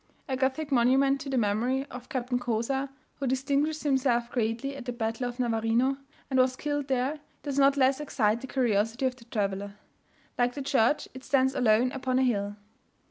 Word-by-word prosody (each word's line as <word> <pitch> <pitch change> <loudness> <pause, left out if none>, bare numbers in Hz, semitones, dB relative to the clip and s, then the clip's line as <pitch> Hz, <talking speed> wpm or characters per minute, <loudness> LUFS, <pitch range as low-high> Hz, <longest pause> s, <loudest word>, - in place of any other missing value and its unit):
A 265 - -1
Gothic 270 +3 -1
monument 270 +2 +3
to 275 - -6
the 265 - 0
memory 240 +5 +1
of 250 0 -9
Captain 250 -1 -1
Cozar, 245 +3 -1 0.3
who 275 - -1
distinguished 280 +4 0
himself 260 -4 +1
greatly 240 +4 -1
at 270 -3 -8
the 245 - -2
battle 235 +1 -2
of 245 +1 -10
Navarino, 235 +3 +1 0.3
and 265 -1 +1
was 255 0 +3
killed 290 0 -2
there, 265 +3 0 0.2
does 280 -1 -2
not 275 0 +5
less 265 0 +3
excite 235 -6 0
the 265 - -7
curiosity 230 -1 +1
of 255 -1 0
the 240 -2 -17
traveller. 200 -3 -2 0.7
Like 245 0 +2
the 280 - -4
church, 265 +1 +2
it 260 0 -10
stands 265 -1 +2
alone 245 -1 +3
upon 260 -1 -1
a 260 - +3
hill. 205 -5 0
255 Hz, 185 wpm, -28 LUFS, 235-270 Hz, 0.7 s, not